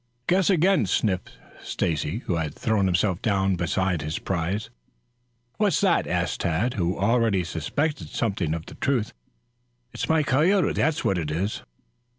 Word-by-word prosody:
"Guess 185 +1 +3
again," 185 - +3
sniffed 95 0 -1 0.2
Stacy, 80 - -2
who 85 - 0
had 80 -2 -3
thrown 110 -4 +1
himself 90 +1 +1
down 95 -3 +1
beside 90 0 0
his 75 +2 -3
prize. 95 - -2 0.9
"What's 205 -7 +2
that?" - - +2
asked - - -1
Tad, 90 +10 0
who 90 -2 -1
already 110 -2 +2
suspected 140 - -2
something 95 -8 -1
of 80 0 -6
the - - -10
truth. 125 -6 -1 0.8
"It's - - -4
my 160 -1 +3
coyote, 165 +9 +3
that's 160 -1 0
what 95 -2 +2
it 80 -3 -3
is." 95 +7 -2
95 Hz, 150 wpm, -25 LUFS, 85-130 Hz, 0.9 s, Guess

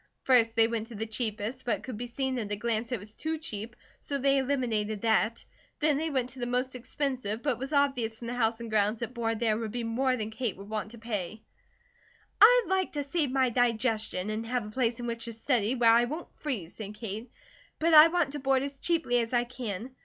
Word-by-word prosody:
First 230 -3 +4
they 225 -1 +5
went 225 -1 -3
to 235 - -10
the 220 +2 -3
cheapest, 225 +2 -3
but 235 - +1
it - - -17
could 255 - -6
be 245 +3 -5
seen 260 +1 -2
at 210 -3 -4
a - - +1
glance 225 +1 -1
that 250 - 0
it - - -3
was 210 +2 -12
too 320 +5 -3
cheap, 230 -7 -6 0.2
so 280 - -3
they 275 0 +3
eliminated 230 -6 -1
that. 220 0 +1 0.3
Then 300 -2 +3
they 320 +1 -1
went 260 -4 -1
to 260 - -11
the 240 - -2
most 250 +1 -1
expensive, 250 -3 -3
but 290 - +2
it 240 - -2
was 270 +2 -5
obvious 270 -6 +1
from 235 - -8
the 235 - -3
house 230 -2 +1
and 235 - -6
grounds 215 +1 +1
that 235 +1 -4
board 225 -2 -1
there 225 -2 +2
would 225 0 -3
be 240 +1 -3
more 255 +3 +1
than 220 -2 -4
Kate 225 -2 -2
would 200 +2 -11
want 215 -1 -2
to 235 - -11
pay. 215 -2 -4 1.0
"I'd - - +8
like 380 -1 0
to 290 -1 -1
save 290 0 0
my 260 -1 +2
digestion, 220 -4 0
and 215 +1 -2
have 245 -2 -1
a 210 - -8
place 235 0 0
in 240 - -4
which 230 -1 -3
to 230 - -5
study, 230 0 +1
where 235 -2 +5
I 235 +1 +5
won't 305 +7 -6
freeze," 220 - -5
said 210 -1 -7
Kate, 220 +2 -6 0.5
"but 330 +1 +2
I 305 +1 +11
want 330 -4 +1
to 295 - -4
board 270 -1 +2
as 280 -1 -6
cheaply 320 -8 +1
as 230 +1 -2
I 240 0 +3
can. 240 -2 -6
240 Hz, 245 wpm, -29 LUFS, 220-265 Hz, 1.0 s, I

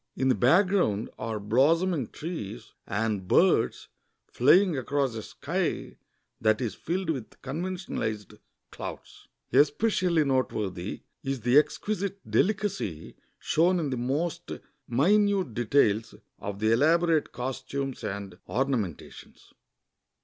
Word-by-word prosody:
In 130 - +1
the - - +5
background 170 - +2
are 110 -1 -3
blossoming 145 - +2
trees, 150 - -7
and 105 -2 -1
birds - - +3 0.4
flying 170 +7 +5
across 135 0 -1
a 110 - -5
sky - - -3 0.4
that 110 -1 +2
is 120 -4 -2
filled 180 0 -2
with 130 -8 -7
conventionalized 135 - -4 0.4
clouds. - - -9 0.3
Especially 165 - +3
noteworthy 105 -8 -2 0.2
is 135 -2 -3
the 120 +3 +2
exquisite 200 +4 -2
delicacy 195 - -1 0.2
sho'ss'n 175 +3 +2
in 155 -4 -1
the 130 - -1
most 140 +7 -2 0.4
minute 190 - +2
details 110 -2 +2 0.2
of 100 -1 -5
the 110 +2 +1
elaborate 160 +5 +3
costumes 135 +1 -4
and 100 -2 -5
ornamentations. 125 - -3
135 Hz, 105 wpm, -27 LUFS, 110-170 Hz, 0.4 s, the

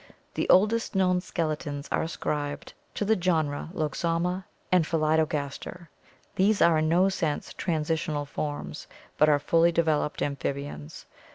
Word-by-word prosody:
The - - -2
oldest 215 +4 +3
known 180 -1 +3
skeletons 150 -5 -3
are - - +1
ascribed 145 -3 -3 0.2
to 205 - -1
the 220 +2 +3
genera 160 -6 0
Loxomma 170 +3 -1 0.3
and 180 -2 +5
Pholi 155 0 +1
dogaster. 155 +3 -3 0.5
These 200 +2 +3
are 165 -2 +5
in 155 0 +1
no 180 +3 +4
sense 170 -6 -2
transitional 155 -2 -1
forms, 145 - -5 0.3
but 150 - +6
are 145 - +5
fully 165 +4 +3
developed 160 -3 0
amphibians. 140 - -4
160 Hz, 130 wpm, -27 LUFS, 145-180 Hz, 0.5 s, but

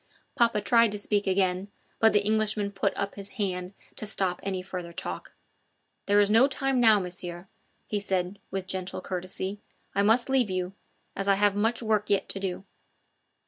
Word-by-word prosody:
Papa 230 -3 +2
tried 230 0 +4
to - - -3
speak 205 0 0
again, 185 0 +1 0.3
but 225 0 +6
the 205 -1 +2
Englishman 215 -1 +1
put 195 -1 0
up 200 0 -2
his 200 0 -9
hand 185 -2 -2 0.2
to 215 - -3
stop 190 -4 +1
any 190 -2 -3
further 180 -2 -6
talk. - - -6 0.7
"There 205 +1 +5
is 205 0 +4
no 230 +5 +6
time 270 -1 0
now, 220 -3 +6
Monsieur," 175 -1 -6 0.4
he 210 - -1
said 190 -1 -2
with 195 -1 -3
gentle 185 0 -4
courtesy. 190 +2 -4 0.3
"I 200 - +2
must 225 +4 +4
leave 265 -5 +2
you, 185 0 -2 0.4
as 195 - -3
I 200 - +5
have 205 0 +3
much 225 +3 0
work 215 -1 +1
yet 200 - +2
to 195 - -3
do." 190 -1 -3
200 Hz, 180 wpm, -27 LUFS, 185-215 Hz, 0.7 s, but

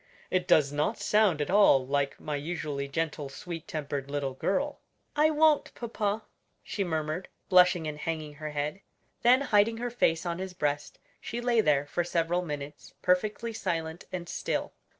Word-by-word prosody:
It 180 -1 +1
does 140 -2 +5
not 150 +9 0
sound 210 -8 +3
at 150 - -1
all 190 -10 +6
like 140 +1 -1
my 150 - -3
usually 145 -2 -3
gentle 150 -1 -2
sweet 165 +3 -7
tempered 140 -3 -4
little 140 -2 -2
girl." 275 - -1 0.4
"I 305 +1 +5
won't, 310 -1 +3
papa," 220 -2 -2 0.4
she 200 - -2
murmured, 160 0 -2 0.2
blushing 180 -3 +5
and 150 -1 -4
hanging 155 -1 -3
her 155 - -3
head. 150 +5 -3 0.4
Then 250 +3 +6
hiding 225 -3 +3
her 240 +1 -3
face 165 -8 +1
on 170 0 -2
his 190 -1 -5
breast, 145 -3 -2 0.2
she 235 - -5
lay 240 -2 +3
there 145 -6 +2
for 175 +4 -1
several 170 +1 0
minutes 150 -3 -7
perfectly 210 +5 +1
silent 165 -4 -3
and 175 -2 -4
still. - - -2
170 Hz, 165 wpm, -29 LUFS, 150-205 Hz, 0.4 s, all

